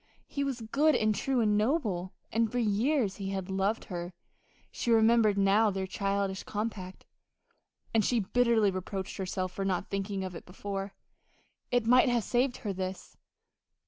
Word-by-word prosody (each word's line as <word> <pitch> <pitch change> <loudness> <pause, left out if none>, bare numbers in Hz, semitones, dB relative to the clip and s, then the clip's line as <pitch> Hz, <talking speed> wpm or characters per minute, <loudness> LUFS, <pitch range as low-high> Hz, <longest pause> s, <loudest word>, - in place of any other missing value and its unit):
He 280 - -3
was 270 -4 -3
good 285 +8 +2
and 215 -1 +2
true 260 +3 0
and 210 -2 +3
noble, 210 - 0 0.2
and 225 -1 +1
for 245 - -2
years 225 0 +1
he 195 -1 -4
had 190 -1 -4
loved 195 +4 0
her 175 -1 -5 0.6
she - - -3
remembered 225 -2 +4
now 200 +3 +4
their 190 -1 -2
childish 195 0 -1
compact, 205 -3 -5 0.9
and 225 -1 +4
she 240 +3 +2
bitterly 230 -1 +3
reproached 190 +1 -5
herself 185 -1 -3
for 195 - -4
not 190 -1 -2
thinking 195 0 -2
of 185 -1 -5
it 165 - -8
before 195 +1 -5 0.7
it 245 -2 +1
might 250 +2 +5
have 240 -2 +1
saved 245 +3 +1
her 205 -3 -4
this.... 185 0 -5
205 Hz, 160 wpm, -30 LUFS, 190-235 Hz, 0.9 s, might